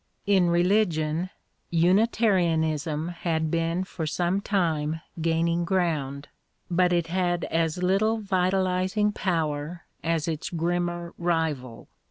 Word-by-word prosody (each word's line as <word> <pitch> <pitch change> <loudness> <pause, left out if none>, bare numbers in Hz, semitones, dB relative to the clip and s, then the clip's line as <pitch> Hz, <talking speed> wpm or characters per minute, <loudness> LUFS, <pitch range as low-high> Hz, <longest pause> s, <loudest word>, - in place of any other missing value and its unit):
In 190 -4 +3
religion 175 -2 +1 0.4
Unitarianism 170 -5 +2
had 160 -2 -2
been 165 +2 0
for 170 -4 -5
some 175 +5 0
time 160 -6 0 0.2
gaining 165 +1 +1
ground, 155 -6 -1 0.4
but 180 +1 +3
it 170 -1 +2
had 175 0 0
as 165 +2 0
little 205 +5 +2
vitalising 190 +1 +1
power 160 -3 -2 0.2
as 165 -1 0
its 160 -2 -3
grimmer 175 0 -2
rival. 160 -9 -2
170 Hz, 105 wpm, -26 LUFS, 160-185 Hz, 0.4 s, In